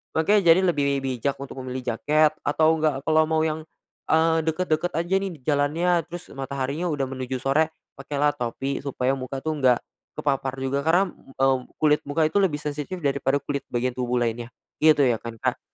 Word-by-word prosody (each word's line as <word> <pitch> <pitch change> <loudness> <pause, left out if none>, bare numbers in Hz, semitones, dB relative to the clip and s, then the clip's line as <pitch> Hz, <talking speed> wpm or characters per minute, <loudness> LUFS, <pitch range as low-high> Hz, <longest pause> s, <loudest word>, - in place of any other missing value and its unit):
makanya 190 +4 +3
jadi 190 - +2
lebih 140 -6 +1
bijak 130 +1 -1
untuk 135 -1 -8
memilih 130 0 -5
jaket, 150 +6 +3
atau 160 +2 +2
enggak, 145 -3 0
kalau 155 0 +3
mau 160 0 +1
yang, 160 0 -1 0.5
eee, 160 +1 +4
deket-deket 160 +1 0
aja 170 +3 -1
nih, 195 -2 -3
jalannya, 150 +5 +1 0.2
terus 175 +1 -8
mataharinya 140 +4 -3
udah 145 -3 -1
menuju 130 0 -4
sore, 150 +4 +3 0.3
pakailah 145 +1 0
topi 135 +1 -3
supaya 130 -2 -1
muka 135 0 -5
tuh 155 0 -1
enggak 125 -2 +4 0.4
kepapar 135 -2 -1
juga, 135 +1 0
karena, 180 +3 +3
mmm, 135 -1 -1 0.2
kulit 150 -1 +5
muka 155 +2 +1
itu 205 - +2
lebih 170 -7 +1
sensitif 150 +4 -4
daripada 140 0 +1
kulit 140 -1 -2
bagian 125 +1 0
tubuh 125 0 -2
lainnya, 115 0 -2 0.3
gitu 155 -2 +6
ya 120 -3 +2
kan, 115 -1 -7
Kak. - - -1
145 Hz, 175 wpm, -24 LUFS, 135-160 Hz, 0.5 s, gitu